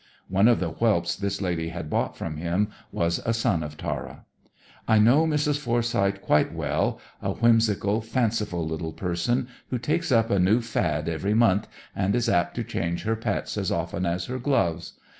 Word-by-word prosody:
(One 95 +3 +4
of 120 - +4
the 90 - -1
whelps 85 -1 +1
this 100 0 -3
lady 85 -3 -1
had 85 -2 -6
bought - - -1
from 80 -2 -5
him 90 +6 0 0.2
was 85 0 0
a 115 - 0
son 115 -7 +1
of 75 -1 -6
Tara.) - - -5 0.6
"I 110 - +5
know 125 +10 +5
Mrs. 150 -1 +1
Forsyth 115 -6 0
quite 75 - +3
well - - -1 0.2
a - - -1
whimsical, 110 -2 +2
fanciful 110 -7 -1
little 80 0 -4
person, 100 +10 -1 0.2
who 125 - -1
takes 150 +5 -1
up 115 -1 +3
a 100 - +3
new 95 +6 +4
fad 80 -10 -1
every 95 +6 -1
month, 110 -2 +3 0.3
and 100 +1 +1
is 120 -1 +1
apt 90 0 +1
to - - -2
change 85 0 -3
her 110 +1 0
pets 115 - -2
as - - -1
often 90 +1 -2
as 85 +1 -1
her 130 +1 -4
gloves. 90 - 0
100 Hz, 180 wpm, -25 LUFS, 85-115 Hz, 0.6 s, I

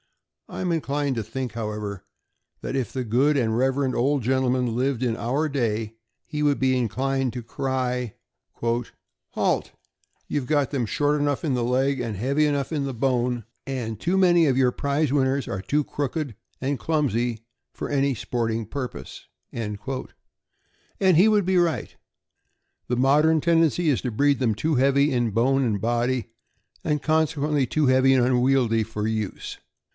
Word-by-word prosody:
I - - -7
am 180 -2 0
inclined 145 -2 -1
to 115 - -2
think, 120 +2 -5
how 110 -2 -3
ever, 105 -2 -5 0.6
that - - -4
if 130 -3 -1
the 130 -2 -3
good 135 +7 +2
and 110 -4 +1
reverend 130 +1 +1
old 135 +1 +1
gentleman 125 -1 +1
lived 130 0 0
in 120 -3 0
our 135 +7 -1
day, 115 -6 -1 0.3
he 150 -1 -3
would 145 -1 +2
be 130 -1 +2
inclined 130 +2 0
to 125 -1 -5
cry: 125 -1 -2 0.2
' - - -58
' - - -59 0.9
Halt! - - +1 0.6
You 145 - -1
have 125 - -10
got 145 -3 +2
them 130 -5 0
short 145 +5 +1
enough 145 +1 0
in 145 - +1
the 125 -1 0
leg, 130 +2 +1
and 115 -4 -3
heavy 140 +8 +1
enough 145 0 -1
in 140 -3 -1
bone, 125 -2 0 0.2
and 120 -5 -4
too 175 - 0
many 175 -3 +5
of 130 -2 +2
your 130 -2 +4
prize 140 +2 0
winners 135 -1 +1
are 95 - -3
too 150 +8 0
crooked 145 -3 -3 0.2
and 135 +1 -1
clumsy 120 -7 -1 0.3
for - - -5
any 140 -1 +1
sporting 115 -2 -2
purpose. 130 +3 -7
" - - -53
And 105 -3 -4 1.4
he 185 +7 +6
would 210 -3 +3
be 185 0 +2
right. 170 -3 0 0.9
The 125 - -1
modern 150 +5 +4
tendency 165 0 +2
is 135 - +1
to 125 - -3
breed 140 +4 +2
them 115 -5 +1
too 155 +8 0
heavy 140 +2 +3
in 120 -2 +1
bone 130 +6 +2
and 110 -5 0
body, 120 +1 -1 0.5
and 150 -2 0
consequently 150 -3 +1
too 155 +3 +1
heavy 130 0 +4
and 125 -2 +4
unwieldy 125 -3 +2
for 105 -1 -4
use. 110 -3 -4
130 Hz, 170 wpm, -24 LUFS, 120-145 Hz, 1.4 s, he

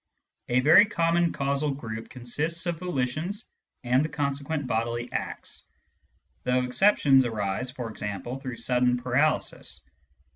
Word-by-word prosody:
A 125 +1 +3
very 165 - +7
common 170 -4 +1
causal 140 +1 -1
group 115 -4 -7
consists 150 +8 -1
of 170 -2 -2
volitions 175 - -2 0.4
and 125 +3 +3
the 155 - -2
consequent 145 0 -2
bodily 120 0 -2
acts, - - -4 0.8
though 125 0 +1
exceptions 135 -1 +4
arise 110 +1 -2
(for 125 -2 -6
example) 105 +4 -5
through 130 -3 -6
sudden 125 -1 +2
paralysis. 125 +5 0
130 Hz, 120 wpm, -27 LUFS, 125-155 Hz, 0.8 s, very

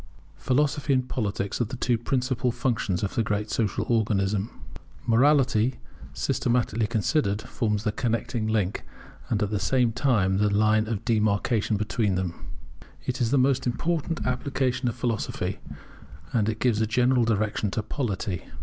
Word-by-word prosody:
Philosophy 145 +2 +1
and 130 -1 +1
Politics 100 -4 -2
are - - +2
the 125 +5 -6
two 125 -1 +1
principal 125 +1 0
functions 115 -6 -1
of 100 - -2
the - - +1
great 105 0 -2
social 105 -5 0
organism. 105 -2 +1 0.6
Morality, 125 -1 +3 0.3
systematically 120 -2 0
considered, 110 -1 +1
forms 105 -4 -1
the 105 - +1
connecting 115 -1 -1
link 105 -4 0 0.5
and 105 -2 +1
at 105 - -2
the 105 - 0
same 120 +4 +2
time 110 -6 +2
the 105 0 +3
line 110 +1 +3
of 110 -3 -3
demarcation 110 0 +1
between 105 -1 0
them. 90 -2 -1 0.7
It 130 0 -2
is 115 - +2
the 140 - +3
most 130 0 +2
important 165 +5 -1
application 130 0 -1
of - - -5
philosophy, 120 -3 -2 0.7
and 110 -3 +2
it 110 - -2
gives 115 -2 +1
a 110 - +2
general 125 +2 +3
direction 110 -2 0
to 110 +3 -2
polity. 100 - -3
115 Hz, 150 wpm, -26 LUFS, 105-125 Hz, 0.7 s, Morality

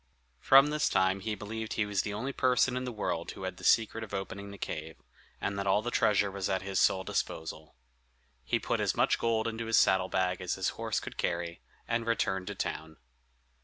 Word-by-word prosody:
From 135 - +6
this 150 -1 +1
time 95 +1 +2
he 105 +2 -3
believed 110 +1 -5
he 110 - 0
was 105 -2 0
the 105 - -4
only 125 +7 -3
person 125 0 +2
in 130 0 -2
the 125 - -3
world 85 -6 -3
who - - -7
had 95 -1 -4
the - - -13
secret 115 0 +3
of 105 -2 -6
opening 100 +1 -5
the 100 - -9
cave, 80 -3 -5 0.4
and 100 0 -2
that 100 - -2
all 100 +2 +3
the 120 - -2
treasure 100 -3 +3
was 100 -1 -3
at 95 -1 0
his 95 -1 -1
sole 95 - +3
disposal. 80 -3 -4 0.7
He 65 - +1
put - - -1
as - - +1
much - - +2
gold 115 -1 +1
into 115 0 -4
his 115 - +3
saddle 95 -1 +4
bag 90 0 0
as 90 - -1
his - - 0
horse - - -2
could - - -8
carry, 85 -1 -2 0.3
and 115 0 -1
returned 95 -5 0
to 100 - -4
town. 80 -3 -4
100 Hz, 215 wpm, -30 LUFS, 95-115 Hz, 0.7 s, From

